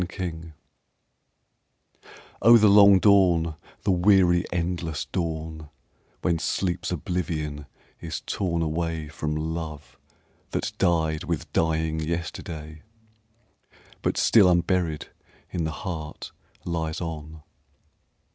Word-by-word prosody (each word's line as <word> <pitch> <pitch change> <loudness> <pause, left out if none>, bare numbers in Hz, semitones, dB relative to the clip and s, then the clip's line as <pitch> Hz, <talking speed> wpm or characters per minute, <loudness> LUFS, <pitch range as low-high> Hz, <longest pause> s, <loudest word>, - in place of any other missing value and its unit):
WAKING 85 -3 -5 1.9
Oh, 120 +1 +8
the 110 -1 +5
long 100 -1 +8
dawn, 90 -5 +4 0.3
the - - +2
weary, 90 -1 +4
endless 85 -2 -2
dawn, 80 -2 -4 0.5
When 85 -3 +1
sleep's 90 +1 -1
oblivion 75 -5 -3 0.3
is 80 -2 -5
torn 85 -4 -1
away 80 -1 -2
From 75 0 -3
love 75 -5 -5 0.5
that - - -1
died 80 -4 +1
with 85 -4 -4
dying 80 -1 +1
yesterday 80 -1 -5 1.2
But - - -1
still 100 -5 +5
unburied 85 -2 0 0.4
in 85 -3 -2
the 80 - -2
heart 80 -4 -6 0.3
lies 80 -2 -2
on! 80 -2 -6
80 Hz, 100 wpm, -25 LUFS, 80-90 Hz, 1.9 s, Oh